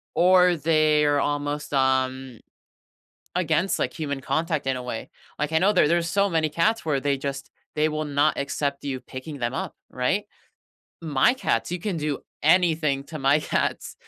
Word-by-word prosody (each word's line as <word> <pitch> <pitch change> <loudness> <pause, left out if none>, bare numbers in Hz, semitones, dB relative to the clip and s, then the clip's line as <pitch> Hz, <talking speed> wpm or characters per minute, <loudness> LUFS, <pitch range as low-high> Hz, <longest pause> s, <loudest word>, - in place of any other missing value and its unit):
or 180 0 +5
they 155 -1 +3
are 145 -1 +3
almost, 145 +1 -2
um 130 -2 0 1.0
against, 175 +1 +1
like, - - -1
human 140 -4 -4
contact 160 +1 -1
in 135 -1 0
a 125 - -5
way, 125 -2 -5 0.3
like, 150 +1 -2
I 160 - +4
know 195 +5 +3
there 185 - +4
there's 170 +1 +1
so 200 +3 +2
many 160 -3 +1
cats 210 +9 0
where 150 -4 +1
they 140 0 0
just 135 0 -5 0.3
they 155 +1 +3
will 155 0 -3
not 145 +1 +2
accept 140 0 -2
you 135 -2 -3
picking 135 +4 -8
them 120 +1 -2
up, - - -4 0.2
right? 130 +12 0 0.8
My 155 - +2
cats, 265 - -1
you 180 - -2
can 190 0 -3
do 150 -3 -2 0.2
anything 155 -4 +3
to 155 +1 -8
my 135 +2 +4
cats - - -2
150 Hz, 175 wpm, -24 LUFS, 140-165 Hz, 1.0 s, or